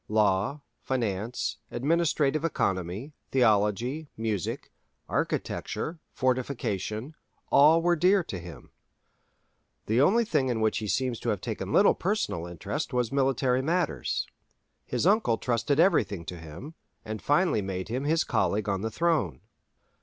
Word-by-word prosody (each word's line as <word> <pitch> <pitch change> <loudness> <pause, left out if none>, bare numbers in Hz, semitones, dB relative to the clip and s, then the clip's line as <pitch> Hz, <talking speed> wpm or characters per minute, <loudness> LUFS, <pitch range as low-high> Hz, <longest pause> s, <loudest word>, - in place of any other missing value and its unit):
Law, 105 +6 +1 0.2
finance, 115 -2 -2
administrative 155 +1 +1
economy, 100 - -1 0.2
theology, 120 +5 +2
music, 110 -5 -3 0.4
architecture, 160 +1 -2
fortification, 125 - -2 0.4
all 160 +4 +6
were 175 0 +4
dear 185 +3 +4
to 95 - -6
him. 85 -3 -11 1.1
The 115 +4 +2
only 225 +10 +4
thing 145 -9 +1
in 120 -2 0
which 110 0 +1
he 110 - -4
seems 125 +3 0
to - - -2
have - - 0
taken - - -4
little - - +5
personal 85 +1 -2
interest 125 - -4
was 125 -2 0
military 130 -2 +2
matters. 160 - -1 0.6
His 125 +4 -1
uncle 195 - +3
trusted 125 +5 0
everything 155 - +3
to 90 0 -7
him, 80 - -9 0.3
and 110 0 -5
finally 145 - +2
made 95 0 -4
him 130 +4 -2
his 160 +2 +2
colleague 105 0 0
on 95 -2 0
the 110 - -2
throne. 150 - 0
125 Hz, 130 wpm, -28 LUFS, 105-150 Hz, 1.1 s, all